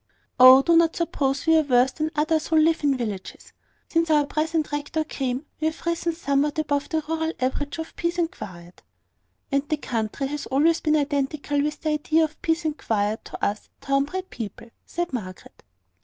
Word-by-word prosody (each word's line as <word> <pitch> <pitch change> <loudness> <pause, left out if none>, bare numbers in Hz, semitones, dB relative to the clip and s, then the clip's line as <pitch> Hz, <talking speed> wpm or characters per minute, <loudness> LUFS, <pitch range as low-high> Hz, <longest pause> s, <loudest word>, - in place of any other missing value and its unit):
"Oh, 255 +1 +9
do 335 +2 +4
not 330 0 +4
suppose 280 -5 -1
we 320 0 +5
are - - +5
worse 255 -3 +3
than 310 +2 -2
others 310 +1 +1
who 320 - 0
live 320 0 +3
in 280 -2 +2
villages. 210 -6 -6 0.3
Since 330 0 +1
our 300 -2 +4
present 310 +1 -1
rector 295 +2 -2
came, 265 -2 -3
we 310 - +1
have 320 - -5
risen 335 0 -1
somewhat 290 -2 0
above 290 -2 -1
the 320 -3 -1
rural 320 0 -1
average 275 +4 -2
of 320 0 -7
peace 340 0 -2
and 335 -1 0
quiet." 175 - -11 0.7
"And 275 +1 0
the 305 - +1
country 230 -1 -3
has 290 +2 -4
always 315 +5 +2
been 310 -1 +2
identical 285 0 -1
with 300 0 -2
the 315 - -1
idea 310 +1 +2
of 310 0 -4
peace 325 0 0
and 305 -1 0
quiet 210 0 -1
to - - -4
us 205 +1 -3
town 275 0 +1
bred 375 +4 -6
people!" 225 +1 -7 0.2
said 345 -3 -3
Margaret. 185 -7 -7
295 Hz, 190 wpm, -24 LUFS, 270-320 Hz, 0.7 s, Oh